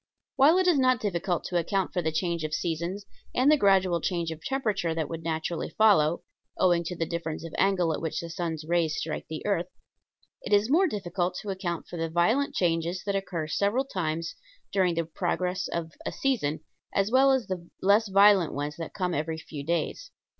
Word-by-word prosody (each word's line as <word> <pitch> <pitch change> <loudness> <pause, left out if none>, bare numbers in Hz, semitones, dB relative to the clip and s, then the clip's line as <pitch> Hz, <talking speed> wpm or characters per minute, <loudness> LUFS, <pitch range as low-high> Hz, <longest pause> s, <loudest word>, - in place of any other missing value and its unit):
While 300 +6 +6
it 375 - +3
is 345 -6 +4
not 255 -2 +3
difficult 180 -3 -1
to 175 -2 0
account 190 +3 -1
for 180 - 0
the 160 -1 -1
change 170 0 -1
of 155 0 -2
seasons 170 +5 -3 0.3
and 260 +4 +4
the - - +7
gradual 190 - +3
change 170 -2 -1
of 160 0 -8
temperature 210 -11 -1
that 160 -3 -1
would 165 -1 -5
naturally 160 +1 -2
follow 175 -7 +3 0.3
owing 175 -2 +3
to 180 - -4
the 165 - -1
difference 165 -1 -4
of 165 - -8
angle 180 -4 +2
at - - -4
which 160 - -2
the 170 0 -6
sun's 160 -2 -4
rays 165 -2 +1
strike 155 -1 -4
the 155 -1 -6
earth 185 -4 0 0.7
it - - -3
is 205 +4 +3
more 365 +5 +5
difficult 180 - -2
to 205 - -3
account 180 -3 -3
for 175 - -7
the 165 0 -2
violent 200 - +1
changes 170 +1 0
that 200 0 -1
occur 180 -5 -2
several 205 - +1
times 165 -7 -3 0.4
during 185 -3 +2
the 165 0 0
progress 180 +2 -2
of 165 -1 -4
a - - -3
season, 210 - -1 0.3
as 200 +2 0
well 270 +2 +5
as 265 -4 +1
the 180 -3 -5
less 205 +3 +4
violent 195 -3 +5
ones 145 +1 -3
that 165 -1 -7
come 180 -3 -1
every 160 +2 -2
few 155 -2 -8
days. 170 - -2
175 Hz, 200 wpm, -27 LUFS, 165-200 Hz, 0.7 s, the